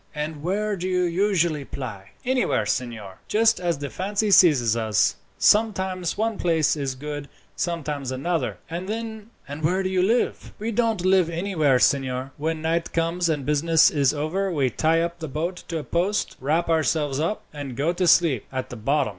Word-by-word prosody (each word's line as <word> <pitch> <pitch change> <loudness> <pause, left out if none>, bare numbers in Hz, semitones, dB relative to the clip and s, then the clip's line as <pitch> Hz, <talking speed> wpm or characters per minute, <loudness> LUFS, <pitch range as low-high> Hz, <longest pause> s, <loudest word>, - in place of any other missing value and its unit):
"And 150 0 -4
where 205 +5 -1
do 185 0 -4
you 180 -1 +1
usually 175 -4 +1
ply?" 110 -9 -7 0.2
"Anywhere, 255 0 +1
signor, 110 -6 -4
just 225 -1 +3
as 175 -3 -1
the 140 0 -6
fancy 205 +2 -1
seizes 135 - +5
us. 110 -2 +2 0.2
Sometimes 190 -5 +2
one 220 0 -1
place 165 -4 +2
is 135 -3 -3
good, 145 +1 -6 0.3
sometimes 150 -6 -3
another." 165 +6 -2
"And 175 +4 -5 0.7
where 180 +5 +1
do 185 - -1
you 185 -1 +1
live?" 225 +6 0
"We 220 +2 -3
don't 225 -4 0
live 185 -3 +4
anywhere, 165 -6 +1
signor. 130 0 +1
When 160 +1 -2
night 165 +1 -1
comes, 170 +1 0
and 145 -4 -1
business 155 +3 +4
is 140 -3 +2
over, 165 +6 -2
we 140 -6 +1
tie 160 +6 +2
up 170 0 -3
the 160 - -5
boat 165 +6 -3
to 165 - -3
a 155 - -4
post, 185 +7 -1
wrap 155 +6 +1
ourselves 155 -3 +1
up, 170 +7 -1
and 140 -4 -7
go 155 +5 +1
to 180 0 0
sleep 160 -9 +4
at 130 -1 -4
the 125 - -6
bottom. 140 +7 +1
165 Hz, 175 wpm, -24 LUFS, 145-185 Hz, 0.7 s, seizes